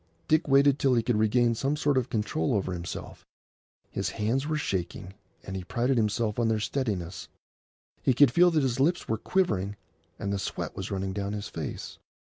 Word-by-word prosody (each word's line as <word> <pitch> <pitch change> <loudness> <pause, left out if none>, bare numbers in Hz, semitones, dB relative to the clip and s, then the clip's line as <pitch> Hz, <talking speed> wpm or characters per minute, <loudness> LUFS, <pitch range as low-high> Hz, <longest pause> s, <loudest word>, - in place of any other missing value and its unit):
Dick 155 +1 +3
waited 140 0 +5
till 135 -2 +3
he 115 - +2
could 115 -2 +1
regain 115 +2 +3
some 135 +5 0
sort 145 -1 +1
of 130 -1 +1
control 105 -8 0
over 95 -2 -1
himself. 85 -1 -6 0.7
His - - -2
hands 125 +7 -1
were 155 0 0
shaking, 95 - -3 0.3
and 95 - -6
he 95 - -4
prided 125 +6 0
himself 105 0 0
on 115 - +2
their 110 -1 +1
steadiness; 105 -8 -3 0.7
he 130 - +2
could 145 -2 +6
feel 175 +6 +6
that 155 -4 +2
his 130 -1 0
lips 170 +6 +2
were 110 - -1
quivering, 105 - 0 0.4
and 100 0 -2
the 100 - -1
sweat - - -4
was - - -5
running 95 0 -2
down 100 0 -3
his 105 -1 -4
face. - - -6
115 Hz, 190 wpm, -28 LUFS, 100-135 Hz, 0.7 s, could